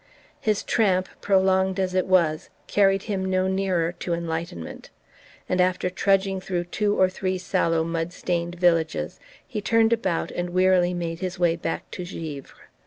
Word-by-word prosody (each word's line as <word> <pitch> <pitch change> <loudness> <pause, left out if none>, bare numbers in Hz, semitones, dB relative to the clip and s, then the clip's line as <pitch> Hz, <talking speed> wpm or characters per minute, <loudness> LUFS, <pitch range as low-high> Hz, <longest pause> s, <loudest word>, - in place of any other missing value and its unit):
His 215 -1 0
tramp, 185 -4 +2
prolonged 190 -1 +2
as 185 -1 0
it 185 0 +1
was, 170 -5 +2 0.2
carried 195 -1 +3
him 195 -4 -2
no 185 0 +1
nearer 190 -3 0
to 170 - -1
enlightenment; 165 - -5 0.6
and 180 0 +2
after 180 0 +1
trudging 195 0 +1
through 180 -2 -2
two 205 +4 -1
or 185 - +6
three 185 0 -2
sallow 180 -3 +1
mud 165 +1 -2
stained 175 -1 -2
villages 170 -2 +1 0.3
he 220 -6 -4
turned 225 +1 +3
about 190 -7 -1
and 175 0 -3
wearily 180 0 +3
made 165 -1 -3
his 185 0 -4
way 175 -2 +2
back 165 0 -4
to 180 - -5
Givre. 160 -5 -8
185 Hz, 160 wpm, -24 LUFS, 170-190 Hz, 0.6 s, or